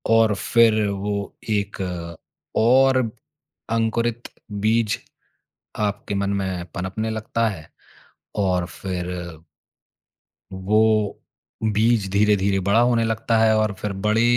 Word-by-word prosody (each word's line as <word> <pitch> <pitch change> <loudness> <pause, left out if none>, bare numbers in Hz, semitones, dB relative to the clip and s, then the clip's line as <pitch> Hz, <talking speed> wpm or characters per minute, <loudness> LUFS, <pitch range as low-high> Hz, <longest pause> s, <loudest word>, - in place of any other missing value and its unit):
और 115 -1 +4
फिर 110 +1 +3
वो 100 +1 -2 0.2
कि 105 -2 +1
एक 100 0 -6 0.8
और 130 +4 +5 0.7
अंकुरित 115 +1 0 0.2
बीज 110 +2 +1 0.8
आपके 105 -1 -2
मन 100 0 0
में 95 -2 -3
पनपनें 95 +5 -3
लगता 110 +1 -1
है 80 -8 -7 0.7
और 90 -3 +1
फिर 90 0 -5 1.4
वो 105 +2 +1 0.5
बीज 110 -1 +2
धीरे-धीरे 100 -1 +2
बड़ा 100 +5 +3
होने 120 -1 +3
लगता 115 +1 0
है 110 0 +4
और 110 -1 +1
फिर 105 - -2
बड़े 110 +2 +3
105 Hz, 110 wpm, -22 LUFS, 100-115 Hz, 1.4 s, और